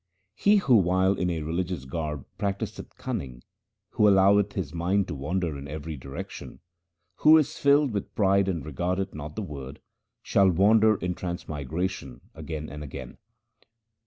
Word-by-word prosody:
He 200 - +3
who 140 - +5
while 95 0 +3
in 90 -2 -1
a 80 -3 -2
religious 85 -2 -3
garb 75 0 -4
practiseth 100 -1 -4
cunning, 60 -2 -5 0.5
who 105 - +3
alloweth 100 +1 +4
his 85 -7 -4
mind 90 +4 0
to - - -3
wander 80 +3 -2
in 70 0 -7
every 75 +2 -6
direction, 70 +8 -8 0.6
Who 155 +1 +7
is 155 0 0
filled 140 -1 +4
with 100 -2 -4
pride 100 -2 +3
and 85 -7 -2
regardeth 90 +6 -2
not 75 0 -7
the 110 - -3
Word, 70 -5 -8 0.4
shall 100 -1 +4
wander 110 +5 +4
in 90 -2 -2
transmigration 80 -5 -4
again 75 -1 -6
and 75 +2 -8
again. 70 - -9
90 Hz, 150 wpm, -26 LUFS, 75-100 Hz, 0.6 s, Who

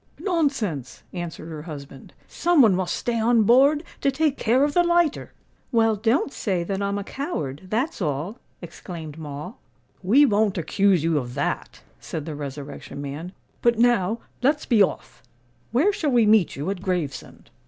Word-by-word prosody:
"Nonsense," 270 - -1
answered 170 -2 -6
her 155 -2 -6
husband. 140 -4 -10 0.2
"Some 340 -4 +3
one 215 -4 +5
must 185 -1 -1
stay 235 -1 -2
on 230 0 +4
board 275 +7 +5 0.2
to 280 - +3
take 295 +1 +1
care 250 +3 +2
of 290 0 +1
the 350 - +5
lighter." 345 -3 +1 0.4
"Well, 225 -2 +3
don't 230 +7 +1
say 185 -5 -1
that 195 +2 -3
I'm 200 0 -1
a 200 - -3
coward—that's 215 - -3
all," 155 - -2 0.2
exclaimed 165 -2 -8
Moll. 150 - -7 0.4
"We 240 +11 +5
won't 210 -5 +2
accuse 185 0 +2
you 165 -2 +2
of 125 -1 -7
that," 140 - -3 0.2
said 150 - -6
the 160 - -5
Resurrection 145 -1 -7
Man. 145 +5 -6 0.3
"But 235 -1 +3
now 230 -3 +3 0.2
let's 290 +4 +2
be 230 -4 +3
off. 195 - -1 0.5
Where 305 - +3
shall 315 -6 -1
we 240 -4 +4
meet 210 -4 +4
you 150 +7 -3
at 190 -2 -5
Gravesend?" 180 -8 -4
200 Hz, 165 wpm, -24 LUFS, 160-250 Hz, 0.5 s, one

